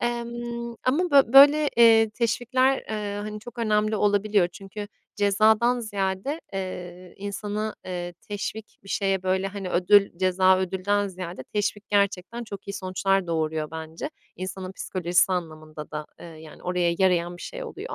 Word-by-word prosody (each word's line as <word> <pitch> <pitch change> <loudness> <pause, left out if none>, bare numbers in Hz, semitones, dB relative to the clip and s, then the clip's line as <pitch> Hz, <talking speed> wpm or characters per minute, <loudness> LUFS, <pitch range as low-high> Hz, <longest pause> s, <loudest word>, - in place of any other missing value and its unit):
Emm, 235 0 -4
ama 330 +8 +1
bö 275 -4 +5
böyle, 285 +2 +8
eee, 225 -2 +6
teşvikler, 245 +4 +1
eee, 210 -2 -4
hani, 210 0 -6
çok 240 +2 -12
önemli 215 -1 +1
olabiliyor 205 -2 +2
çünkü 200 +3 -8 0.3
cezadan 220 +4 +3
ziyade, 200 - -2
eee, 180 -2 -6
insana, 205 +2 -4
eee, 175 -1 -5 0.2
teşvik 210 +1 -6
bir - - -13
şeye, 195 -1 0
böyle, 190 +1 0
hani, 195 -1 -5
ödül 185 0 +4
ceza, 185 0 +4
ödülden 190 +2 0
ziyade 180 -6 -7
teşvik 205 0 -3
gerçekten 200 +3 0
çok 200 -2 -9
iyi - - -3
sonuçlar 195 0 0
doğuruyor 160 -2 -1
bence. 160 - -6 0.3
İnsanın 185 0 -6
psikolojisi 180 0 +1
anlamında 155 -3 -5
da, 150 0 -5
eee, - - -9
yani 160 -2 -12
oraya 175 -1 0
yarayan 175 -2 +2
bir - - -11
şey - - -6
oluyor. 475 - -7
200 Hz, 145 wpm, -25 LUFS, 180-220 Hz, 0.3 s, böyle